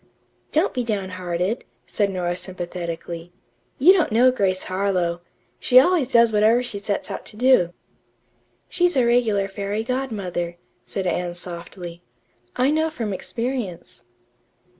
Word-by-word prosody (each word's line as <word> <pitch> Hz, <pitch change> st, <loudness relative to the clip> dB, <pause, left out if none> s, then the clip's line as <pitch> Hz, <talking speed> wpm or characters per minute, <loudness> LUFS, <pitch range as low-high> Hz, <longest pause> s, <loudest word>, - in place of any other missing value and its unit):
"Don't 320 Hz, +6 st, +2 dB
be 250 Hz, -, -1 dB
down 205 Hz, -5 st, -2 dB
hearted," 185 Hz, +4 st, -2 dB, 0.2 s
said 205 Hz, -2 st, 0 dB
Nora 175 Hz, -2 st, -2 dB
sympathetically. 175 Hz, -2 st, -6 dB, 0.5 s
"You 340 Hz, +8 st, +7 dB
don't 355 Hz, -, +2 dB
know 245 Hz, +4 st, +5 dB
Grace 190 Hz, -6 st, 0 dB
Harlowe. 185 Hz, -3 st, -1 dB, 0.4 s
She 255 Hz, 0 st, +7 dB
always 310 Hz, -1 st, +3 dB
does 235 Hz, -3 st, +4 dB
whatever 220 Hz, +4 st, +4 dB
she 225 Hz, -5 st, -4 dB
sets 200 Hz, 0 st, -3 dB
out -, -, -5 dB
to 210 Hz, -, -9 dB
do." 245 Hz, -8 st, +4 dB, 1.0 s
"She's 355 Hz, -2 st, +2 dB
a 255 Hz, -3 st, +4 dB
regular 225 Hz, -5 st, +2 dB
fairy 200 Hz, +2 st, -3 dB
godmother," 200 Hz, -9 st, -3 dB, 0.3 s
said 195 Hz, -, -4 dB
Anne 175 Hz, -1 st, -1 dB
softly. 175 Hz, 0 st, -8 dB, 0.5 s
"I 255 Hz, +3 st, +3 dB
know 315 Hz, +1 st, +2 dB
from 230 Hz, -10 st, -4 dB
experience." 210 Hz, -, -4 dB
200 Hz, 135 wpm, -23 LUFS, 180-250 Hz, 1.0 s, You